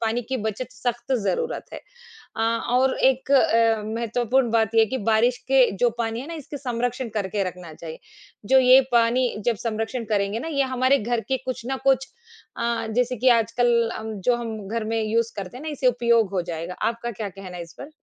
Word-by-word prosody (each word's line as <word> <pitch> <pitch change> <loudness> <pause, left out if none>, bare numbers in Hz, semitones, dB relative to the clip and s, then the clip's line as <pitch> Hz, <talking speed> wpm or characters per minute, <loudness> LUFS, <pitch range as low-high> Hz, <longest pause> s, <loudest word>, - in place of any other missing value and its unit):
पानी 230 +1 0
की 265 - -1
बचत 220 +5 -5
सख्त 240 +2 -3
ज़रूरत 480 - -1
है। - - -7 0.6
अ, 225 - -2
और 240 +3 +1
एक 265 +2 -7
अ, 230 -4 +4
महत्वपूर्ण 235 +3 0
बात 225 -1 +1
ये - - +6
है - - +5
कि 260 - -1
बारिश 240 +3 +3
के 265 -2 +5
जो 240 +4 +3
पानी 230 0 -2
है 275 - -9
ना 335 - -6
इसके 300 -2 -7
संरक्षण 245 -1 -3
करके 200 -1 -1
रखना 180 -3 -11
चाहिए, 160 0 -9 0.5
जो 265 +5 +5
ये 255 +1 +7
पानी 240 +2 +3 0.2
जब 240 - +2
संरक्षण 230 +2 -2
करेंगे 205 +1 0
ना 285 - -5
ये 280 -4 +1
हमारे 260 +2 +4
घर 235 +2 -1
के 265 - +2
कुछ 255 -2 -4
ना 265 - -2
कुछ 270 0 +3 0.5
अ, 235 -1 -1
जैसे 250 +2 0
कि 255 +4 +3
आजकल 230 +2 0 0.3
अम, 220 0 -5
जो 245 +6 +2
हम 220 -4 -6
घर 225 +2 -2
में 225 +1 -1
यूज़ 230 +2 0
करते 200 +3 -6
हैं 270 - -10
ना 315 - -4
इसे 280 -3 0
उपयोग 235 -3 +3
हो 185 - 0
जाएगा। 170 0 -5
आपका 235 +1 -3
क्या 215 -2 -5
कहना 185 -1 -9
है 175 - -5
इस 170 - -15
पर? 275 - -8
235 Hz, 210 wpm, -24 LUFS, 220-255 Hz, 0.6 s, ये